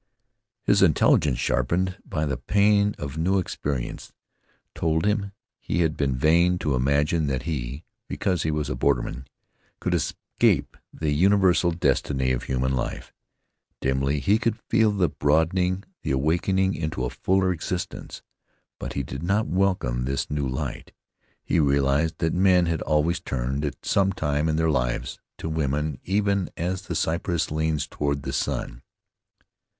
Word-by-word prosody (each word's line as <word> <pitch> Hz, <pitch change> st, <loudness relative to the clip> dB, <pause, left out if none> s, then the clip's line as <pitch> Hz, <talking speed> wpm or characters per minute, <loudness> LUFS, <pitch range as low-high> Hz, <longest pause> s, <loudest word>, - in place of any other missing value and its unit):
His -, -, +3 dB
intelligence, 70 Hz, -5 st, +4 dB
sharpened 85 Hz, +10 st, 0 dB
by 80 Hz, -4 st, -2 dB
the 70 Hz, -3 st, -1 dB
pain 100 Hz, +9 st, +2 dB
of 75 Hz, +1 st, -5 dB
new 95 Hz, +4 st, +2 dB
experience, 70 Hz, -8 st, -3 dB, 0.6 s
told 80 Hz, +2 st, 0 dB
him 105 Hz, -1 st, 0 dB, 0.3 s
he 85 Hz, -, -1 dB
had 80 Hz, -2 st, +1 dB
been 70 Hz, -3 st, 0 dB
vain 85 Hz, +6 st, +3 dB
to 75 Hz, -5 st, -1 dB
imagine 70 Hz, +5 st, +1 dB
that 65 Hz, -1 st, -1 dB
he, 70 Hz, -2 st, -4 dB, 0.2 s
because 90 Hz, -4 st, -1 dB
he 80 Hz, -, 0 dB
was 75 Hz, -2 st, -1 dB
a 70 Hz, -, -2 dB
borderman, 65 Hz, 0 st, -1 dB, 0.5 s
could -, -, -1 dB
escape -, -, 0 dB, 0.2 s
the 80 Hz, -2 st, -2 dB
universal 90 Hz, +2 st, +4 dB
destiny 70 Hz, -5 st, 0 dB
of 65 Hz, -1 st, -2 dB
human 65 Hz, 0 st, 0 dB
life. 65 Hz, -, -4 dB, 0.7 s
Dimly 70 Hz, +2 st, 0 dB
he 100 Hz, +10 st, +2 dB
could 115 Hz, -2 st, 0 dB
feel 110 Hz, -1 st, +2 dB
the 95 Hz, -4 st, +2 dB
broadening, 90 Hz, +6 st, +1 dB, 0.2 s
the -, -, -4 dB
awakening 90 Hz, +8 st, +1 dB
into 80 Hz, -5 st, -3 dB
a -, -, -3 dB
fuller 95 Hz, 0 st, +1 dB
existence, 90 Hz, +2 st, -5 dB, 0.6 s
but -, -, -5 dB
he 70 Hz, -, -2 dB
did -, -, -6 dB
not 100 Hz, +6 st, +1 dB
welcome 90 Hz, -11 st, 0 dB
this 70 Hz, +2 st, -2 dB
new 75 Hz, -2 st, -1 dB
light. 65 Hz, 0 st, -5 dB, 0.5 s
He -, -, +1 dB
realized 70 Hz, +2 st, +2 dB
that 80 Hz, -, 0 dB
men 90 Hz, -1 st, +4 dB
had 85 Hz, -1 st, -1 dB
always 75 Hz, +3 st, +1 dB
turned, 65 Hz, +3 st, -3 dB
at 75 Hz, -, -5 dB
some 95 Hz, 0 st, +2 dB
time 75 Hz, -2 st, 0 dB
in 80 Hz, -, +1 dB
their 80 Hz, 0 st, +2 dB
lives, 60 Hz, -4 st, -1 dB, 0.2 s
to -, -, -5 dB
women 75 Hz, -2 st, -1 dB
even 100 Hz, -1 st, 0 dB
as 90 Hz, +2 st, -2 dB
the 90 Hz, -2 st, -5 dB
cypress 85 Hz, 0 st, -1 dB
leans 80 Hz, -1 st, 0 dB
toward 70 Hz, -1 st, -2 dB
the 65 Hz, -, -4 dB
sun. -, -, -2 dB
80 Hz, 150 wpm, -25 LUFS, 70-90 Hz, 0.7 s, intelligence